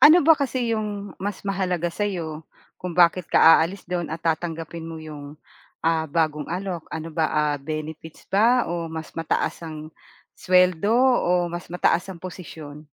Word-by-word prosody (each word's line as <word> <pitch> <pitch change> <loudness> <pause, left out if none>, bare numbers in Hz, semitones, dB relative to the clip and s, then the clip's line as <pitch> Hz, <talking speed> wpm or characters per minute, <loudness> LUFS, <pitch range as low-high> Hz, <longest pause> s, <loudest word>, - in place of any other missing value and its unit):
Ano 330 +4 +9
ba 320 +2 +6
kasi 250 -5 -1
'yong 205 -2 -5
mas 200 0 -4
mahalaga 185 -3 -1
sa'yo, 170 -5 -3 0.3
kung 180 -1 -5
bakit 175 0 +4
ka - - +5
aalis 165 +4 +6
do'n 175 -3 -2
at 160 - -5
tatanggapin 165 0 -3
mo 165 -1 -7
'yong, 150 -1 -10 0.4
ah, 165 -1 +1
bagong 155 -1 0
alok? 180 -2 -4
Ano 160 +1 -4
ba, 160 0 0
ah, 150 -1 +1
benefits 155 +2 -7
ba 230 +4 +3
o 170 -1 -3
mas 160 0 -7
mataas 165 -1 -1
ang 155 -1 -7 0.5
suweldo 180 +2 +3
o 180 -9 +3
mas 175 0 -7
mataas 180 0 +2
ang 170 - -13
posisyon? 155 -5 -9
170 Hz, 155 wpm, -24 LUFS, 160-190 Hz, 0.5 s, Ano